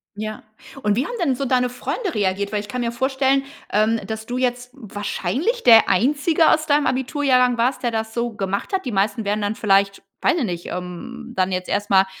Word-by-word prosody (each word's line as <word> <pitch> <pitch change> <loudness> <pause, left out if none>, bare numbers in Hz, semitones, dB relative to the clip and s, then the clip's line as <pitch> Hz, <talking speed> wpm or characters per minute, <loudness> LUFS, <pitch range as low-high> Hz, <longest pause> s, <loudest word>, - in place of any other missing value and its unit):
Ja. 215 +1 -6 0.4
Und 210 -1 +2
wie 255 +6 0
haben - - -5
denn 270 -5 +1
so 275 - -3
deine 250 -1 +2
Freunde 335 - -4
reagiert? 200 0 0
Weil 210 - 0
ich 205 - -11
kann 250 +4 -4
mir 235 0 -1
vorstellen, 265 +2 +1 0.3
ähm, 220 +2 +2
dass 220 0 -5
du 245 +2 -4
jetzt 250 -1 -1
wahrscheinlich 235 - -3
der 225 -2 +7
einzige 295 - +3
aus 310 - +3
deinem 290 -1 +2
Abiturjahrgang 255 -2 +2
warst, 250 +3 0
der 240 - +1
das 220 0 -3
so 235 0 -1
gemacht 200 - -3
hat. 380 -6 -1
Die 250 - -2
meisten 205 +2 0
wären 210 +1 0
dann 205 +1 -1
vielleicht, 195 -1 +2 0.2
weiß 345 - +2
ich 275 - 0
nicht, 175 -3 -5
ähm, 180 +7 -7
dann 185 0 +1
jetzt 185 0 -3
erst 205 +1 -1
mal 190 0 +6
235 Hz, 210 wpm, -21 LUFS, 205-260 Hz, 0.4 s, der